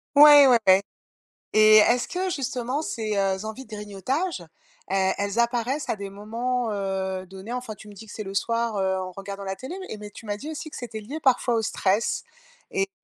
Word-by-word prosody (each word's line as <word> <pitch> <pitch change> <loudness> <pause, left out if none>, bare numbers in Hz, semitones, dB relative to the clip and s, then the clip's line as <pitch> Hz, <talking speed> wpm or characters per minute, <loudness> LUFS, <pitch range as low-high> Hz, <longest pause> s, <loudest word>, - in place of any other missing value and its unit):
Ouais, 290 -1 +10
ouais, 250 -2 +6
ouais. 190 +1 +7 0.7
Et 215 0 +7
est-ce 235 +3 +4
que, 370 +1 -2
justement, 260 -1 -2
ces, 220 -8 -3
heu, 195 0 0
envies 220 +5 -7
de 215 - -9
grignotage, 210 - -3 0.5
e 190 -1 +2
elles 200 +2 -2
apparaissent 240 +4 0
à - - 0
des 200 0 -6
moments, 230 +4 -2
heu, 190 -2 -3
donnés? 190 +5 -9
Enfin 250 -3 -4
tu 215 - -14
me 205 - -11
dis 210 +3 -12
que - - -11
c'est 215 - -5
le 195 - -6
soir, 230 +1 0
heu, 190 0 +1
en 185 0 -5
regardant 195 +1 -7
la 190 0 -3
télé 265 +8 -7 0.2
et 215 - -6
mais 210 0 -9
tu 225 - -13
m'as 205 0 -2
dit 295 +9 -7
aussi 310 0 -6
que - - -9
c'était 225 -3 -6
lié 275 +10 -7
parfois 250 -2 +3
au 225 - +1
stress. 200 +1 0 0.5
Et 395 -3 0
220 Hz, 210 wpm, -25 LUFS, 200-250 Hz, 0.7 s, Ouais